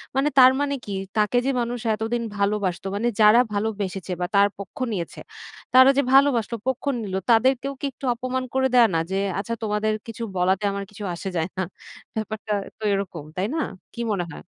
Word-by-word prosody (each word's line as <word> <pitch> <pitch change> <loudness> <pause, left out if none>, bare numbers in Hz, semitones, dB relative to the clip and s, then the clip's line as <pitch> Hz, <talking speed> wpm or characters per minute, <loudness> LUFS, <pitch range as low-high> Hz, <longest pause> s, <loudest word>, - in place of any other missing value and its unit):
মানে 275 +2 +2
তার 255 -1 +9
মানে 285 0 0
কি, 205 - -6 0.3
তাকে 210 +3 +2
যে 275 - +2
মানুষ 240 +1 -3
এতদিন 225 +2 -2
ভালোবাসতো 200 -2 0
মানে 230 +4 0
যারা 215 +2 +7
ভালোবেসেছে 200 -3 -3
বা - - +1
তার 200 0 +6
পক্ষ 200 +8 -9
নিয়েছে। 175 -5 -4 0.5
তারা 260 +1 +8
যে - - +5
ভালোবাসল 265 -5 +4
পক্ষ 260 -1 -1 0.2
নিলো, 190 -3 -3
তাদের 240 +4 +5
কেও 275 +1 -3
কি - - -2
একটু 270 - -9
অপমান 255 +1 -2
করে 265 0 +3
দেয় 240 -2 +7
না? - - +3
যে, 195 - 0 0.2
"আচ্ছা 210 +4 -3
তোমাদের 215 0 0
কিছু 230 0 -6
বলাতে, 190 +2 +2
আমার 200 0 -3
কিছু 210 0 -10
আসে 190 +3 -5
যায় 165 +2 -1
না।" 190 - 0 0.5
ব্যাপারটা 215 0 -3 0.2
তো 220 - -12
এরকম, 185 -5 -3
তাই 185 +2 -1
না? - - 0 0.3
কি - - -10
মনে 180 -3 -1
হয়? - - -10
215 Hz, 195 wpm, -24 LUFS, 195-245 Hz, 0.5 s, তার